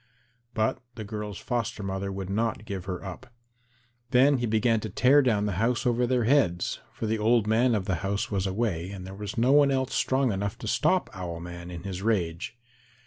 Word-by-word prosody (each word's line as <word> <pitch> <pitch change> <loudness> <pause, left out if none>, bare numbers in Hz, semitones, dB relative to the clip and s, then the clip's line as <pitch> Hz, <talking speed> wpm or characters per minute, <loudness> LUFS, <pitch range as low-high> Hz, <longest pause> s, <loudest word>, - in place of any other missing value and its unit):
But 110 0 +1 0.2
the 110 - -6
girl's 105 -2 -5
foster 115 -2 -3
mother 95 0 -3
would 95 -1 -5
not 110 +1 -1
give 100 -4 -5
her 95 0 -5
up. 95 +7 -8 0.8
Then 130 +2 +5
he 120 - 0
began 110 +1 +2
to 110 - -5
tear 130 +8 +5
down 110 -6 +2
the 105 - 0
house 120 +3 +1
over 120 0 +2
their 125 -1 +2
heads, 110 -9 +2
for - - -5
the 110 0 0
old 115 0 +3
man 115 +3 +3
of 100 -3 -1
the 95 -2 0
house 100 +5 -2
was 95 -1 0
away 95 -4 -1
and 95 -2 -7
there 95 - -8
was 100 +1 -6
no 120 +3 +3
one 145 0 +6
else 130 -1 0
strong 130 -2 +2
enough 100 0 -2
to - - -7
stop - - +2
Owl 85 -3 -5
man 85 0 -8
in 85 -1 -7
his 95 -2 -5
rage. 95 -1 -1
105 Hz, 205 wpm, -27 LUFS, 95-120 Hz, 0.8 s, one